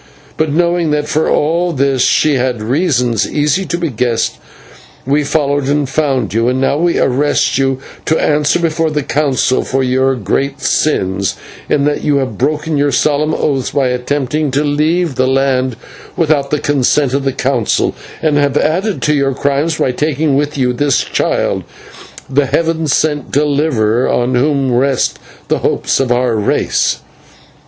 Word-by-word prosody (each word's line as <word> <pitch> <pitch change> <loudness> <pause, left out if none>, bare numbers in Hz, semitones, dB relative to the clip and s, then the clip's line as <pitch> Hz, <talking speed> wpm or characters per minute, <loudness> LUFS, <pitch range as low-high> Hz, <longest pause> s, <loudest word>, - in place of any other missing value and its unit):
But, 155 -1 0
knowing 170 +1 +1
that 150 0 0
for 155 +1 0
all 170 +3 +1
this 135 -2 +1
she 155 - +3
had 125 -3 0
reasons 125 - 0
easy 150 +5 0
to 170 - -2
be 170 -3 -2
guessed, 120 0 -1 0.7
we 145 +3 +1
followed 145 -2 0
and 145 0 +1
found 135 -7 -1
you, 115 +2 +1
and 130 +1 +1
now 135 +2 +1
we 170 0 +1
arrest 135 0 +1
you 135 -1 +1 0.3
to 160 - +1
answer 150 +1 +2
before 165 -1 0
the 150 -2 -2
Council 135 -3 +1
for 135 0 -1
your 130 +1 +1
great 135 +6 -2
sins, 95 -11 0 0.3
in 140 -1 +2
that 150 0 -1
you 145 -1 +2
have 130 -7 -2
broken 150 +3 -1
your 145 0 +1
solemn 150 +2 +1
oaths 135 -4 -1
by 135 -2 0
attempting 140 +4 -1
to 140 +3 0
leave 155 +3 0
the 130 0 +1
land 130 -2 +1 0.4
without 150 -4 +1
the 150 - 0
consent 140 -1 +1
of 140 0 0
the 135 - 0
Council, 125 -4 0 0.3
and 155 -2 +2
have 145 -1 +1
added 185 +8 0
to 150 - +2
your 140 -2 0
crimes 140 +4 0
by 130 - +1
taking 150 +1 0
with 145 +1 -1
you 125 -2 +1
this 140 0 +1
child, - - -1 0.6
the 140 +1 +1
Heaven 165 +2 0
sent 150 0 0
deliverer, 140 -6 +1
on 125 +1 0
whom 135 0 +1
rest 130 +1 +1 0.3
the - - 0
hopes - - 0
of 130 -2 0
our 120 -1 +1
race." 105 -1 0
140 Hz, 165 wpm, -14 LUFS, 130-150 Hz, 0.7 s, she